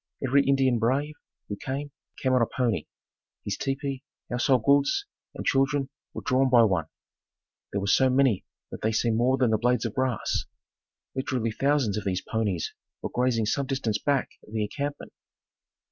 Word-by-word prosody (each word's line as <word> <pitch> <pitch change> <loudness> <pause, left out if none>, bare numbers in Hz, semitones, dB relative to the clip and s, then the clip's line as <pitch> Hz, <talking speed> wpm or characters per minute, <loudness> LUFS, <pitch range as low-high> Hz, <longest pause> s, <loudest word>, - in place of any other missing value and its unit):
Every 140 +2 +4
Indian 135 -3 +3
brave, 135 +6 +1 0.3
who 100 - -4
came, 140 +5 -4 0.3
came 130 -1 +1
on 130 - +4
a 115 - +3
pony. 120 -5 -1 0.6
His 100 - -1
tepee, 135 +1 -3 0.3
household 125 0 +2
goods 140 - +3 0.3
and - - -6
children 135 0 +2 0.2
were - - -7
drawn 130 0 +3
by 120 -2 +7
one. 95 -7 +1 0.8
There 100 - -1
were - - -2
so 130 +6 +4
many 130 -6 +3 0.3
that - - -7
they 110 +1 +1
seemed 110 0 +1
more 130 +3 +3
than 125 -4 +2
the 110 - +2
blades 125 0 +2
of 115 - -2
grass. 130 -4 -1 0.7
Literally 125 -3 -1
thousands 135 -3 +1
of - - -8
these 95 -1 -1
ponies 105 -7 -1 0.3
were - - -3
grazing 125 -3 +1
some 135 +5 0
distance 125 -6 -1
back 140 +2 +1 0.2
of 105 - -14
the 110 -1 0
encampment. 145 +6 -4
130 Hz, 170 wpm, -27 LUFS, 110-135 Hz, 0.8 s, by